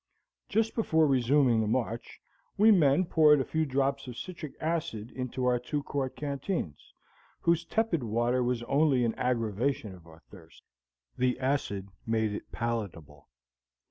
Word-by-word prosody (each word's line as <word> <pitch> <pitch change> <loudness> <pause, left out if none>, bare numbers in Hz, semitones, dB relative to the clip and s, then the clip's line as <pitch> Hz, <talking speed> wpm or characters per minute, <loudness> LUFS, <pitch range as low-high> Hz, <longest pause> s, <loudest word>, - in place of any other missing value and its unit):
Just 225 +2 +1
before 160 -8 +2
resuming 130 -3 +3
the 110 - -1
march, 115 0 -2 0.4
we 215 +2 +6
men 160 -2 +4
poured 155 -3 +5
a 135 - -1
few 160 -1 -1
drops 135 0 0
of 120 -2 -8
citric 170 -5 -7
acid 155 -9 -3
into 130 0 -4
our 125 -1 +2
two 140 +4 -3
quart 140 -3 -3
canteens, 140 - -4 0.5
whose 170 0 +2
tepid 220 -4 0
water 120 +2 0
was 125 -1 -1
only 140 -1 +2
an 115 - 0
aggravation 115 -2 -1
of 90 -2 -15
our 80 0 -16
thirst; 85 -5 -16 0.6
the 125 0 +1
acid 130 -8 -1 0.2
made 110 -2 0
it 105 - -7
palatable. 90 - -5
130 Hz, 145 wpm, -29 LUFS, 115-150 Hz, 0.6 s, we